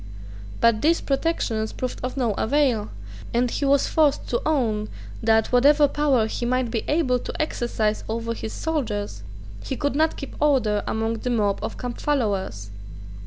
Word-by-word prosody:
But 230 Hz, -2 st, +4 dB
these 330 Hz, +2 st, +3 dB
protections 270 Hz, -7 st, -1 dB
proved 255 Hz, -1 st, -4 dB
of 255 Hz, +2 st, -4 dB
no 240 Hz, -5 st, +1 dB
avail; 240 Hz, -2 st, +1 dB, 0.5 s
and 245 Hz, 0 st, +2 dB
he 285 Hz, -, -1 dB
was 280 Hz, 0 st, +4 dB
forced 300 Hz, -3 st, +2 dB
to 240 Hz, -, 0 dB
own 225 Hz, -8 st, 0 dB, 0.3 s
that, 220 Hz, 0 st, +3 dB
whatever 290 Hz, +4 st, +5 dB
power 280 Hz, -5 st, +2 dB
he 220 Hz, -, -4 dB
might 250 Hz, -1 st, 0 dB
be 225 Hz, -, -1 dB
able 290 Hz, -5 st, +2 dB
to -, -, -7 dB
exercise 235 Hz, -7 st, -1 dB
over 230 Hz, +1 st, -2 dB
his 220 Hz, -1 st, -6 dB
soldiers, 215 Hz, -, -3 dB, 0.4 s
he 265 Hz, -, -3 dB
could 285 Hz, -1 st, -1 dB
not 315 Hz, +2 st, +2 dB
keep 275 Hz, -, -7 dB
order 250 Hz, -8 st, +2 dB
among 225 Hz, +1 st, -1 dB
the 250 Hz, -, -3 dB
mob 210 Hz, -4 st, +1 dB
of -, -, -4 dB
campfollowers. 205 Hz, -, -2 dB
245 Hz, 160 wpm, -24 LUFS, 220-285 Hz, 0.5 s, whatever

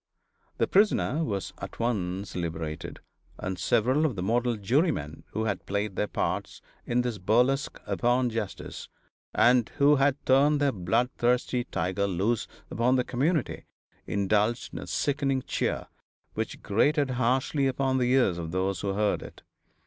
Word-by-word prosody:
The -, -, +2 dB
prisoner 185 Hz, -6 st, +2 dB
was 100 Hz, -, -3 dB
at -, -, -8 dB
once 100 Hz, -5 st, -2 dB
liberated, 80 Hz, -3 st, -4 dB, 0.4 s
and 95 Hz, -1 st, -4 dB
several 120 Hz, -, +2 dB
of 145 Hz, -8 st, +1 dB
the 90 Hz, -, -3 dB
model 120 Hz, +3 st, +1 dB
jurymen 100 Hz, -, 0 dB
who 110 Hz, -, -1 dB
had 105 Hz, -3 st, -3 dB
played 100 Hz, 0 st, -2 dB
their 105 Hz, -, 0 dB
parts -, -, -2 dB, 0.3 s
in 120 Hz, +1 st, +2 dB
this 120 Hz, -4 st, -3 dB
burlesque 125 Hz, +8 st, +1 dB
upon 125 Hz, 0 st, +1 dB
justice, 110 Hz, -3 st, -5 dB, 0.5 s
and 120 Hz, -1 st, +4 dB
who 145 Hz, 0 st, +5 dB
had 135 Hz, 0 st, +3 dB
turned 140 Hz, +3 st, +4 dB
their 145 Hz, -1 st, +3 dB
bloodthirsty 120 Hz, +5 st, 0 dB
tiger 95 Hz, +4 st, -1 dB
loose 100 Hz, +5 st, 0 dB, 0.2 s
upon 125 Hz, +3 st, +2 dB
the 125 Hz, -, +2 dB
community 150 Hz, +8 st, -1 dB, 0.4 s
indulged 105 Hz, +4 st, 0 dB
in -, -, -5 dB
a -, -, -8 dB
sickening 135 Hz, -2 st, 0 dB
cheer -, -, -2 dB, 0.5 s
which -, -, -4 dB
grated 140 Hz, +7 st, +2 dB
harshly 130 Hz, +3 st, +1 dB
upon 130 Hz, 0 st, 0 dB
the 125 Hz, 0 st, +2 dB
ears 120 Hz, -10 st, +3 dB
of 80 Hz, -1 st, -4 dB
those 95 Hz, +1 st, -1 dB
who 100 Hz, -1 st, -1 dB
heard 105 Hz, +1 st, +1 dB
it. -, -, -11 dB
120 Hz, 150 wpm, -27 LUFS, 100-130 Hz, 0.5 s, who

